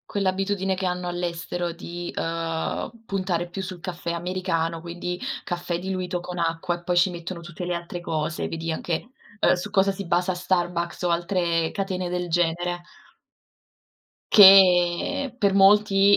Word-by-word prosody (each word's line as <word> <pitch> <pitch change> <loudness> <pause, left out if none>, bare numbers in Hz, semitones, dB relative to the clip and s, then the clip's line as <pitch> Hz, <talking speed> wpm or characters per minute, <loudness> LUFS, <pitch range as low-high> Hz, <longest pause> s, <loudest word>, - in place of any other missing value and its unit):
Quell'abitudine 195 0 0
che 190 +1 -3
hanno 180 0 -2
all'estero 175 0 -3
di, 175 0 -7
ehm, 165 +2 -3
puntare 185 -4 -1
più 190 +2 -5
sul 185 -1 -6
caffè 170 -1 -4
americano, 170 -2 -2
quindi, 175 +1 -5 0.3
caffè 175 -1 -3
diluito 185 -1 -3
con 180 +1 -7
acqua 170 +1 -1
e 175 - -12
poi 175 0 0
ci 180 +2 +5
mettono 175 +1 -6
tutte 170 +1 -8
le 175 - -1
altre 170 +1 -6
cose, 155 -2 -2
vedi 165 0 -3
anche, 170 +8 -3 0.3
ehm, - - +4
su 180 +3 -3
cosa 195 -1 +3
si 195 0 -6
basa 175 +2 +1
Starbucks 175 -1 -1
o 175 - +1
altre 170 -2 0
catene 185 -2 -3
del 180 0 -3
genere. 175 +1 0 1.5
Che 195 +6 +6
per 200 -5 +2
molti, 200 0 +6
175 Hz, 150 wpm, -24 LUFS, 170-190 Hz, 1.5 s, Che